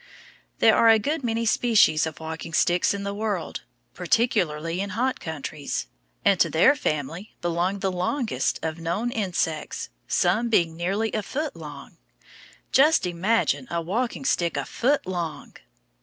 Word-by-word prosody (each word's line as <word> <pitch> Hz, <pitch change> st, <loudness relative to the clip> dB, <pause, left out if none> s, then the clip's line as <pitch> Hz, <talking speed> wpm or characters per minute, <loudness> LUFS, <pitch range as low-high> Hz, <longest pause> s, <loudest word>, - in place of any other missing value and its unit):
There 220 Hz, -1 st, +5 dB
are 230 Hz, -, +5 dB
a 225 Hz, -, +7 dB
good 290 Hz, +7 st, -2 dB
many 230 Hz, -1 st, -1 dB
species 215 Hz, -10 st, +4 dB
of 160 Hz, -, -8 dB
walking 160 Hz, +1 st, -6 dB
sticks 175 Hz, +2 st, +3 dB
in 200 Hz, 0 st, -3 dB
the 200 Hz, 0 st, -3 dB
world, 205 Hz, -4 st, -3 dB, 0.3 s
particularly 175 Hz, -4 st, 0 dB
in 200 Hz, -, -3 dB
hot 255 Hz, +2 st, 0 dB
countries; 155 Hz, -2 st, -4 dB, 0.4 s
and 200 Hz, -3 st, +4 dB
to -, -, +4 dB
their 220 Hz, -, +5 dB
family 165 Hz, -, -3 dB
belong 175 Hz, +3 st, -1 dB
the 195 Hz, -, 0 dB
longest 215 Hz, +8 st, -1 dB
of 160 Hz, 0 st, -3 dB
known 175 Hz, +9 st, -2 dB
insects, 180 Hz, -8 st, -2 dB, 0.2 s
some 215 Hz, +7 st, +2 dB
being 170 Hz, -7 st, +2 dB
nearly 195 Hz, +6 st, -1 dB
a 215 Hz, -, 0 dB
foot 295 Hz, +9 st, -4 dB
long. -, -, -10 dB, 0.7 s
Just 300 Hz, -1 st, +5 dB
imagine 195 Hz, +8 st, 0 dB
a 170 Hz, -, -1 dB
walking 230 Hz, +10 st, -2 dB
stick 170 Hz, -, +1 dB
a 140 Hz, -, -2 dB
foot 275 Hz, -, 0 dB
long! 175 Hz, -4 st, -5 dB
190 Hz, 150 wpm, -25 LUFS, 165-230 Hz, 0.7 s, a